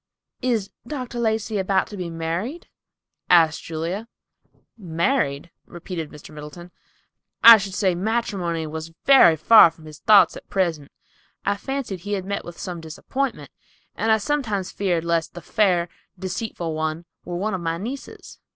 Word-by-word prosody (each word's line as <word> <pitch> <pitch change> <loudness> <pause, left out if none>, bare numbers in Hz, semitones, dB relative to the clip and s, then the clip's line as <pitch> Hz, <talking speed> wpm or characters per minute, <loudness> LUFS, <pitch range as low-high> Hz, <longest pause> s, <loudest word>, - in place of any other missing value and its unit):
"Is 230 -6 -1 0.2
Dr. 250 -4 -5
Lacey 220 -2 0
about 190 0 +1
to 210 - -8
be 180 -3 -5
married?" 170 - -4 0.6
asked 165 -3 +5
Julia. 170 +7 -4 0.7
"Married," 170 - -1 0.2
repeated 175 -2 -6
Mr. 150 +1 -13
Middleton; 150 +4 -10 0.7
"I 230 0 +12
should 195 -2 -5
say 190 -4 +2
matrimony 185 -4 -2
was 160 +1 -7
very 270 -12 +7
far 170 +5 +7
from 160 -1 -17
his 155 -1 -11
thoughts 210 -2 +5
at - - -12
present. 165 -7 -1 0.6
I 200 - +1
fancied 250 -3 -4
he 205 +4 -5
had 190 -2 -2
met 200 +1 -3
with 175 0 -10
some 175 -2 -6
disappointment 250 - -4 0.4
and 225 - 0
I 220 - +5
sometimes 215 -6 -2
feared 175 -4 -1
lest 170 -1 -1
the - - -6
fair, 185 -6 +1 0.3
deceitful 185 -2 -4
one 155 +2 -3 0.2
were 175 - -5
one 210 +3 -2
of 185 - -3
my 165 0 -2
nieces. 245 +9 -8
185 Hz, 150 wpm, -23 LUFS, 165-220 Hz, 0.7 s, I